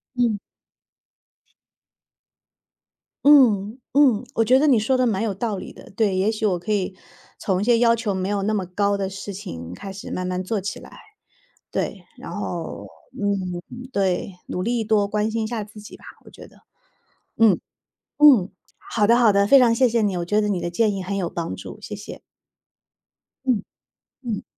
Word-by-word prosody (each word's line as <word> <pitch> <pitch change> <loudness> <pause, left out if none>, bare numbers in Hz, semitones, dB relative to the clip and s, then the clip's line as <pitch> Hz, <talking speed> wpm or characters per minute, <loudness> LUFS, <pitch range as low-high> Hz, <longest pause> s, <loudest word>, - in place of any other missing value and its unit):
嗯。 235 -4 +1 2.9
嗯， 235 -7 +5
嗯， 255 -5 +4
我 225 - +2
觉 255 +3 +5
得 285 - +3
你 255 -6 +5
说 240 +5 +1
得 255 0 +2
蛮 215 -4 0
有 220 -3 -1
道 210 +1 -3
理 - - -8
的， - - -14
对， 200 -1 +1
也 190 +4 +2
许 220 0 -2
我 190 -4 +2
可 180 +5 -5
以 195 -2 -1 0.4
从 190 -2 -1
一 - - -1
些 240 0 +4
要 230 -1 +5
求 230 -3 -1
没 190 0 -2
有 205 -1 -1
那 215 +2 0
么 200 -3 -1
高 200 +3 0
的 195 -1 -2
事 195 +1 -7
情 90 - -7
开 195 - -8
始 195 +1 -9
慢 185 - -3
慢 180 0 -2
做 195 +2 -2
起 200 - -5
来。 - - -13 0.8
对， - - -3
然 - - -9
后， - - -5 0.3
嗯， 190 -3 -1 0.3
对， 195 -2 0
努 180 - -3
力 235 +1 0
多 210 -1 +2
关 210 +1 0
心 225 0 -1
一 - - -2
下 230 -3 -3
自 210 +1 -13
己 210 - -11
吧， - - -20 0.2
我 - - -14
觉 - - -13
得。 - - -21 0.8
嗯， 220 -5 +5 0.6
嗯， 260 -11 +6 0.4
好 210 -2 +2
的 235 +2 +5
好 235 -3 +5
的， 200 0 +3
非 275 - +8
常 240 -2 +5
谢 250 +1 +3
谢 230 0 +1
你， 200 -3 0
我 175 - -2
觉 210 +4 +1
得 210 -1 0
你 185 -3 -1
的 175 - -2
建 210 +4 +1
议 195 - -4
很 195 +2 -3
有 185 -3 -1
帮 170 0 -4
助， - - -10
谢 - - -6
谢。 - - -9 1.3
嗯。 240 -6 +1 0.6
嗯。 225 -5 -3
205 Hz, 205 characters per minute, -23 LUFS, 190-230 Hz, 2.9 s, 非